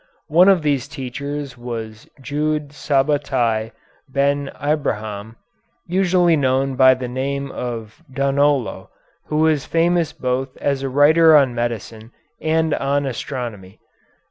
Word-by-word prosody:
One 175 +5 +6
of 185 -5 +4
these 140 -3 0
teachers 140 -1 -6
was 115 -3 -7
Jude 150 +2 -2
Sabatai 135 -6 0 0.4
Ben 140 +1 0
Abraham, 110 -8 -2 0.5
usually 180 -2 +3
known 135 -1 +1
by 130 0 +6
the 130 -1 -5
name 140 +2 -3
of 115 0 -6
Donolo, 140 0 0 0.4
who 150 - -2
was 155 -2 +2
famous 170 -1 +1
both 130 +1 -3
as 140 -1 -1
a 135 - -2
writer 155 +4 +6
on 135 -4 +3
medicine 115 -1 -4 0.3
and 160 0 +1
on 140 +1 0
astronomy. 115 -7 -6
140 Hz, 115 wpm, -20 LUFS, 125-150 Hz, 0.5 s, One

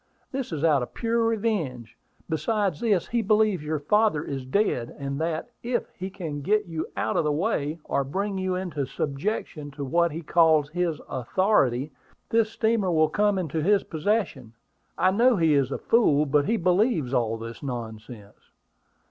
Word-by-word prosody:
This 270 -5 -4
is 155 -2 -3
out 150 -5 +4
of 125 - -6
pure 230 0 0
revenge. 205 - -1 0.3
Besides 195 0 0
this, 205 -7 +1
he 235 0 +1
believes 210 -5 +2
your 155 +1 -1
father 160 +1 +2
is 135 -4 -5
dead, 130 - 0
and 140 +1 -4
that, 165 +7 -2
if 240 +1 -2
he 190 +1 -5
can 165 -7 -6
get 210 +7 +1
you 165 -3 -4
out - - 0
of - - +2
the 150 - +1
way, 155 -2 -1
or 140 - 0
bring 195 +8 -2
you 185 -1 -1
into 165 -7 -3
subjection 150 - -3
to 140 0 -6
what 170 +4 +2
he 165 +3 -6
calls 155 -2 +4
his 170 -2 -1
authority, 135 - +1 0.4
this 225 -1 +3
steamer 220 -4 +1
will 155 -2 +3
come 205 +3 +2
into 160 -3 -2
his 200 +4 +3
possession. 160 - -2 0.4
I 185 - +3
know 240 +5 +4
he 165 -5 +3
is 140 -2 +2
a - - -1
fool; 155 -11 +3
but 145 0 +2
he 230 - +1
believes 180 - +1
all 115 -3 +1
this 115 0 -8
nonsense." 115 -4 -8
165 Hz, 175 wpm, -26 LUFS, 140-205 Hz, 0.4 s, out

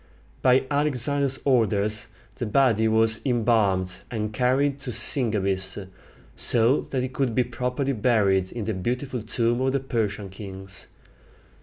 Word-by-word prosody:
By 130 +1 +4
Alexander's 140 -1 0
orders 105 -5 +1 0.3
the - - -4
body 110 -2 +3
was 110 0 +2
embalmed, 110 -7 +1
and 110 -2 -3
carried 135 +4 +1
to 135 -2 -7
Sisygambis, 100 -6 0 0.5
so 120 +4 +3
that 130 -2 -3
it 130 0 -4
could 130 -5 -1
be 125 - +3
properly 125 +3 -2
buried 100 -5 +2
in 120 - -5
the 110 - -2
beautiful 125 +6 -3
tomb 115 +2 0
of 130 0 +1
the 140 - +1
Persian 110 -6 -2
kings. 95 -1 -9
115 Hz, 135 wpm, -25 LUFS, 105-130 Hz, 0.5 s, By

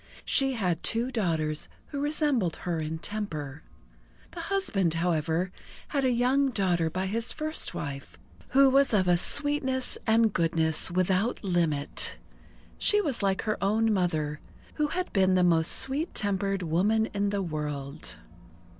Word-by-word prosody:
She 270 -1 +3
had 180 -8 -1
two 235 +3 0
daughters 160 -9 -1 0.2
who 285 -2 -4
resembled 290 - 0
her 170 -2 -1
in 155 +1 -3
temper. 160 -7 -5 0.7
The 350 - -9
husband, 330 - 0
however, 165 +1 0 0.4
had 280 -2 0
a 260 - +3
young 255 +3 +2
daughter 180 -8 0
by 185 +4 -3
his 225 +4 -1
first 310 0 -2
wife, 140 -2 -6 0.3
who 275 +1 +5
was 275 -3 +3
of 185 -3 +2
a 175 - +5
sweetness 265 - +1
and 225 -1 +3
goodness 165 -1 +1
without 185 +6 0
limit. 165 -6 0 0.6
She 415 - +4
was 285 - -1
like 195 -1 0
her 215 -3 -2
own 220 +2 +2
mother, 155 -6 -1 0.3
who 300 -1 0
had 360 +4 -4
been 190 -2 +3
the 180 - +3
most 165 -2 +3
sweet 285 +6 +2
tempered 195 -2 0
woman 200 +7 +2
in 200 0 0
the 200 -1 -1
world. 150 -4 -4
195 Hz, 145 wpm, -27 LUFS, 165-250 Hz, 0.7 s, who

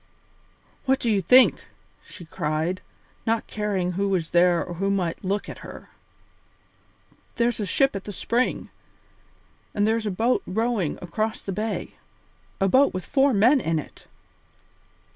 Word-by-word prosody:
"What 265 0 +2
do 235 - 0
you 200 -2 +2
think!" 250 +9 +5 0.4
she 175 - -12
cried, 160 +2 -2 0.5
not 225 0 +1
caring 200 -4 -2
who 195 +2 -1
was 180 -4 -1
there 175 0 +3
or 175 - -7
who 195 +3 -1
might 185 -4 -1
look 200 +2 -2
at - - -8
her. - - -11 1.4
"There's 235 0 +1
a 205 - -2
ship 270 +4 +2
at 195 - -5
the 205 - -5
spring, 240 +5 -1 1.0
and 205 +1 +2
there's 220 0 0
a - - +1
boat 225 +6 +1
rowing 220 -4 -1
across 215 +5 -3
the 195 - -4
bay. 215 +2 -4 0.6
A 195 - +3
boat 265 +2 +4
with 185 - -4
four 275 0 +3
men 245 +6 +4
in 165 0 0
it!" 150 - -8
200 Hz, 150 wpm, -24 LUFS, 180-230 Hz, 1.4 s, think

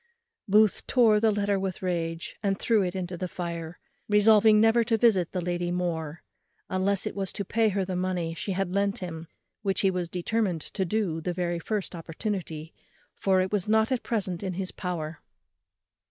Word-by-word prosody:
Booth 210 +1 +3
tore 225 -5 +5
the 220 +1 +3
letter 205 -1 +1
with 190 -1 -4
rage, 165 -2 -2
and 195 -2 0
threw 225 0 +2
it 180 -1 -2
into 180 -1 -3
the 185 +1 -3
fire, 170 -2 -5 0.3
resolving 210 +1 +6
never 225 +2 +5
to 225 0 +1
visit 205 -7 +3
the 180 - -2
lady 175 0 -2
more, 170 -3 -3 0.5
unless 190 +1 +1
it - - -4
was 195 -2 -2
to 200 - -4
pay 220 +3 +2
her 195 -1 -1
the 185 0 -3
money 180 -2 -1
she 195 +4 -3
had 190 -1 -1
lent 200 +2 +1
him, 165 -4 -6 0.3
which 195 -3 0
he 195 - +3
was 180 -2 -3
determined 180 -1 -1
to 190 - -3
do 180 -5 -1
the 180 +2 -2
very 175 -1 -1
first 205 +3 -3
opportunity, 165 -2 -5 0.4
for 190 -1 +2
it 185 - -2
was 205 -3 0
not 220 +2 +3
at 255 - +1
present 190 -6 -2
in 190 -2 -3
his 185 +1 -3
power. 165 -4 -4
185 Hz, 185 wpm, -27 LUFS, 175-210 Hz, 0.5 s, resolving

